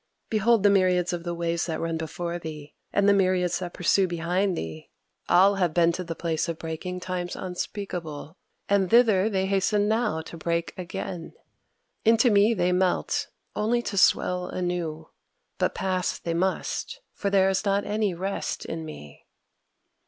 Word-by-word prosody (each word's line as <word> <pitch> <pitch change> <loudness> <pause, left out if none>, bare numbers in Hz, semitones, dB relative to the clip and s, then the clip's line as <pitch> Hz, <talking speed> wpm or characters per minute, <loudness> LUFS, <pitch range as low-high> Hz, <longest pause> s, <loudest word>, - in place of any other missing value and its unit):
Behold 220 0 +3
the 205 - +6
myriads 180 -2 +3
of 170 -1 -4
the 175 0 -3
waves 170 0 -1
that 160 -2 -2
run 165 0 -2
before 170 +2 -4
thee, 155 -2 -8 0.2
and 200 0 +2
the 205 - +6
myriads 185 -3 +2
that 180 -2 -6
pursue 185 +2 +3
behind 175 +2 0
thee! 80 -1 -6 0.4
all 195 +2 +5
have 175 -4 +1
been 170 -1 +5
to 180 +2 -4
the 165 -1 -5
place 165 -1 -1
of 165 - -3
breaking 165 +3 -5
times 180 -1 -4
unspeakable; 180 -4 -5 0.3
and 195 -2 +2
thither 220 -4 +5
they 190 -3 0
hasten 200 +2 +1
now 220 -6 +1
to 160 - -10
break 170 +1 -2
again. 180 -1 -6 0.7
Into 230 +2 +5
me 205 +3 +4
they 180 -2 +1
melt, 180 0 +1 0.3
only 235 +3 +1
to 205 - -4
swell 180 -1 +3
anew. 170 -3 -3 0.5
But - - +1
pass 185 -1 -1
they 170 - -3
must; 190 - -2
for 200 - -2
there 195 -1 +4
is 190 - 0
not 200 0 +1
any 210 -3 0
rest 195 +3 -3
in 165 0 -5
me." 115 - -11
180 Hz, 165 wpm, -26 LUFS, 170-200 Hz, 0.7 s, the